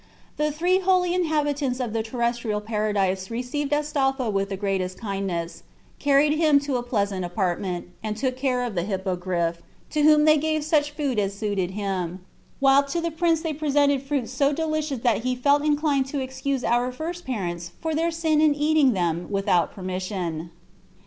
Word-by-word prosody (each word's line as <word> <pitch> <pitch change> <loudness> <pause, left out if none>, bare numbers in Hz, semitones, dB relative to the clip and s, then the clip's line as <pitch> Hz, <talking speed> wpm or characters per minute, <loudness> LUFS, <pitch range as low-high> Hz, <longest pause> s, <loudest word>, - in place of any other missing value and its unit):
The 300 0 +1
three 355 +5 +2
holy 365 -2 +2
inhabitants 295 -6 0
of 240 -4 -2
the 225 - 0
terrestrial 235 -1 -1
paradise 205 -3 -1
received 250 +5 -3
Astolpho 275 -5 0
with 195 0 -1
the 195 - -3
greatest 190 -2 -2
kindness, 195 -5 -3 0.4
carried 285 +1 +4
him 305 -3 +5
to 280 -3 -1
a - - -2
pleasant 200 -6 -1
apartment, 180 0 -2 0.2
and 215 -1 -3
took 260 +1 0
great 255 - -16
care 255 -2 +1
of 240 -3 -3
the 175 - 0
Hippogriff, 180 -3 -2 0.3
to 305 - +1
whom 300 0 +6
they 310 0 +6
gave 310 0 0
such 295 -1 +2
food 285 -6 -1
as 200 -1 -1
suited 200 -4 -1
him, 185 -3 -3 0.3
while 270 0 +6
to 310 +5 -2
the 335 0 -2
prince 325 0 +1
they 325 -2 -2
presented 285 -2 +2
fruits 275 -4 -2
so 275 +2 +2
delicious 310 -4 -2
that 235 -4 +2
he 255 +1 -1
felt 285 +3 +3
inclined 295 -2 +1
to 280 +1 -3
excuse 260 0 -2
our 245 +2 +1
first 335 +7 -5
parents 175 -8 -4
for 320 -1 -2
their 325 +2 +1
sin 320 -2 +1
in 305 -2 +4
eating 295 -3 +3
them 175 -2 -1
without 195 -3 +1
permission. 185 -3 -4
255 Hz, 175 wpm, -24 LUFS, 195-295 Hz, 0.4 s, whom